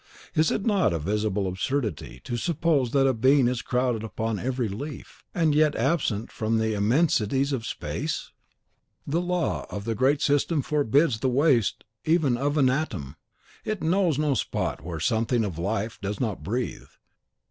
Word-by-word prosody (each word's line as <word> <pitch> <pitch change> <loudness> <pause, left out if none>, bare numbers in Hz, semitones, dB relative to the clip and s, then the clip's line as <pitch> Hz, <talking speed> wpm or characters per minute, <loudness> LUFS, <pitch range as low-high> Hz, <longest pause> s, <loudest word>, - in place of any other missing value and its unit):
Is 155 0 +3
it 200 - -1
not 200 - +2
a - - 0
visible 100 +3 -1
absurdity 95 - -3
to 120 - -4
suppose 145 0 +1
that 135 0 +3
being 130 0 +5
is 125 -1 -1
crowded 125 -3 0
upon 110 0 -3
every 125 0 -1
leaf, 140 +9 -8
and 160 -3 +2
yet 150 0 +3
absent 115 -10 0
from 110 +1 -1
the 110 0 0
immensities 130 +3 +2
of 115 -4 -3
space? - - -4 0.7
The 160 +5 0
law 180 -3 -1
of 100 0 -6
the 115 - 0
Great 135 +6 +2
System 145 +1 +2
forbids 145 -3 +2
the 130 - +1
waste 130 -4 +2 0.2
even 155 -6 +2
of 145 +4 -1
an 135 -3 +5
atom; 100 - -3 0.5
it 215 -5 -3
knows 170 -2 +2
no 150 -2 +2
spot 120 - -2
where 85 -1 -5
something 115 - +1
of 90 -5 -5
life 110 +4 -2
does 100 0 -3
not 110 -6 -2
breathe. 120 +5 -3
125 Hz, 160 wpm, -26 LUFS, 110-150 Hz, 0.7 s, being